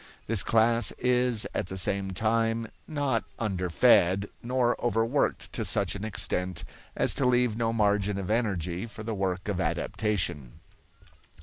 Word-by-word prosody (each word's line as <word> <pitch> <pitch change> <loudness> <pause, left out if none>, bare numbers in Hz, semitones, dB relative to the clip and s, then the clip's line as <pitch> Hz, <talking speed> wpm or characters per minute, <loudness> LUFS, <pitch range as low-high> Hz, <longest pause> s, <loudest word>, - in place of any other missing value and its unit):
This 110 -3 +2
class 115 +2 +3
is 125 -2 +2
at 100 - -2
the 95 - -6
same 95 +1 0
time 115 +3 0 0.2
not 145 -7 0
underfed 95 -1 +3 0.2
nor 125 0 +1
over 115 -2 +2
worked 135 +5 -1
to - - -2
such - - +1
an 100 - -6
extent 90 -5 -1 0.3
as - - +2
to 135 - 0
leave 125 -3 +2
no 115 0 0
margin 105 -2 +1
of 100 +1 -3
energy 95 -4 -1
for 110 -1 -9
the 110 +1 -3
work 95 -2 -2
of 95 -3 -1
adaptation. 85 - -2
110 Hz, 145 wpm, -28 LUFS, 95-115 Hz, 0.3 s, class